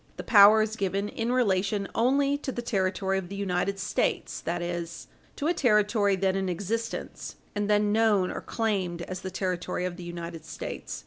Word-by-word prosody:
The - - -5
power 215 0 +7
is 215 0 -3
given 200 +1 -1
in 230 +2 -2
relation 200 -4 +1
only 275 +4 +2
to 285 - -4
the 240 - -5
territory 195 -3 0
of 175 -2 -8
the 200 - -6
United 195 0 -1
States 195 - -1
that 175 +1 -1
is, 175 -1 -4 0.3
to 285 - -4
a 335 - +3
territory 210 - +3
then 190 0 +1
in 190 -1 -1
existence, 205 +6 -4 0.2
and 205 0 -2
then 210 0 +3
known 210 -4 +3
or - - -5
claimed 190 -7 -2
as 185 0 -5
the 190 - -4
territory 180 -1 -2
of 180 -1 -4
the 180 - -8
United 170 -2 -7
States. 160 - -6
200 Hz, 185 wpm, -27 LUFS, 180-215 Hz, 0.3 s, power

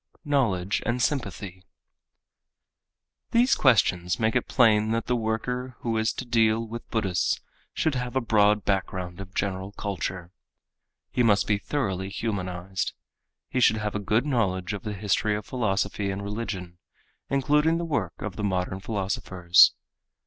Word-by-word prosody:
Knowledge 100 -10 +1
and 120 +1 -1
Sympathy_ 105 - -2 1.7
These 240 +3 +5
questions 90 -9 +3
make 110 0 +1
it 125 - +1
plain 110 -3 +4
that 115 - -1
the 125 - +1
worker 120 +3 -2
who 115 -1 -1
is 110 0 +1
to 130 - -6
deal 115 -1 +2
with 115 +1 -8
Buddhists 95 -6 0 0.4
should 160 - +1
have 125 -1 -3
a - - +4
broad 105 -3 +3
background 95 -2 -2
of 95 -1 -9
general 95 0 -2
culture. 95 -3 -4 0.8
He - - +1
must 105 -4 +4
be 105 -1 +1
thoroughly 95 -7 -2
humanized. 95 -3 -3 0.5
He 130 - -1
should 110 -2 +5
have 105 -1 -2
a 105 - -2
good 105 +5 +1
knowledge 100 -9 0
of 100 - -4
the 105 -2 -4
history 105 +1 0
of 105 -1 -5
philosophy 105 -4 -1
and 95 +1 -3
religion, 100 -4 -5 0.5
including 150 +4 +2
the 170 - -2
work 115 - -2
of 105 -3 -5
the 105 - -3
modern 95 -1 -1
philosophers. 95 -3 +3
105 Hz, 150 wpm, -26 LUFS, 95-120 Hz, 1.7 s, These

